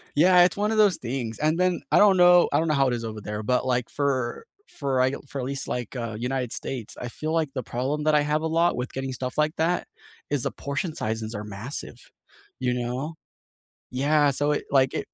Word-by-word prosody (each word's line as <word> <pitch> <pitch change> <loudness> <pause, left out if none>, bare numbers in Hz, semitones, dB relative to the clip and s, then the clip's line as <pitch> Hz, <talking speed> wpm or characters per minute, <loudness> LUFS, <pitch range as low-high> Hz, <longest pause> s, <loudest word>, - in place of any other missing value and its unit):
Yeah, 180 +3 +6
it's 180 - +1
one 210 +2 0
of 220 - 0
those 205 -5 +5
things, 120 -2 -4
and 155 +2 +1
then, 180 -1 +2
I - - +6
don't 205 -2 +6
know 175 0 +6
I - - +4
don't 165 - 0
know 155 - +2
how 135 -1 +3
it 125 - 0
is 115 -1 -4
over 110 -1 -5
there, 105 +1 -5
but, 125 +4 +1
like, 125 -2 0
for 135 - -1 0.2
for 135 -3 -2
I 130 +1 +4
l - - -6
for 140 - -6
at - - -3
least, 140 0 -3
like, 125 +1 -4
uh, 115 -2 -4
United 125 0 -2
States, 120 -5 -5
I 125 - -4
feel 155 +6 -4
like 160 -3 +1
the 130 - -2
problem 135 +6 -2
that 155 0 +3
I 150 - +5
have 150 +1 0
a - - -1
lot 165 +2 +2
with 125 +1 -4
getting 135 0 -4
stuff 130 +1 -5
like 150 +1 +1
that 170 +3 0 0.4
is 145 -4 0
the - - -1
portion 140 +4 -3
sizes 110 -1 -3
are 105 0 -5
massive, 105 +7 -7 0.5
you 125 -1 0
know? 125 +6 -3 0.8
Yeah, 145 +2 +3
so, 145 +2 0
it 150 - -1
like, 135 -1 +3
it - - -1
135 Hz, 240 wpm, -25 LUFS, 125-155 Hz, 0.8 s, Yeah